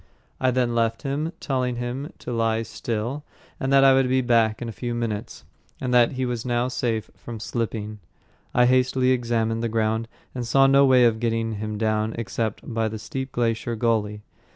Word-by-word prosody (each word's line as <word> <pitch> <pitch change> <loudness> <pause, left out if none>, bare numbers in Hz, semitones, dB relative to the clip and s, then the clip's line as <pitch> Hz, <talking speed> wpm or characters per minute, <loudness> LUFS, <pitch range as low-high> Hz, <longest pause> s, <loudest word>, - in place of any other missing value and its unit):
I 130 - +2
then 125 -1 +1
left 115 +1 0
him, 145 +3 -2
telling 130 -3 -1
him 125 +6 -4
to - - -7
lie 115 -1 +1
still, 115 +5 -4 0.4
that 135 0 +4
I 135 -1 +7
would 130 -1 +3
be 130 0 +3
back 115 -3 +2
in 120 - -5
a - - -4
few 120 +2 -4
minutes, 115 -1 -4 0.3
and 125 -2 -2
that 120 0 +5
he 130 0 -1
was 120 -2 -3
now 120 0 0
safe 115 -3 -2
from 115 -2 -8
slipping. 110 -2 -4 0.5
I 125 - +4
hastily 130 0 +3
examined 115 -2 0
the 115 - -1
ground 110 0 0 0.3
and 125 - -3
saw 135 +4 +4
no 140 0 +6
way 130 -2 +6
of 110 -1 +2
getting 115 -1 0
him 105 0 -4
down 110 0 0
except 115 -1 -3
by 115 0 +1
the 110 0 -4
steep 130 +4 -5
glacier 115 0 -1
gully. 105 -2 0
120 Hz, 185 wpm, -24 LUFS, 110-130 Hz, 0.5 s, I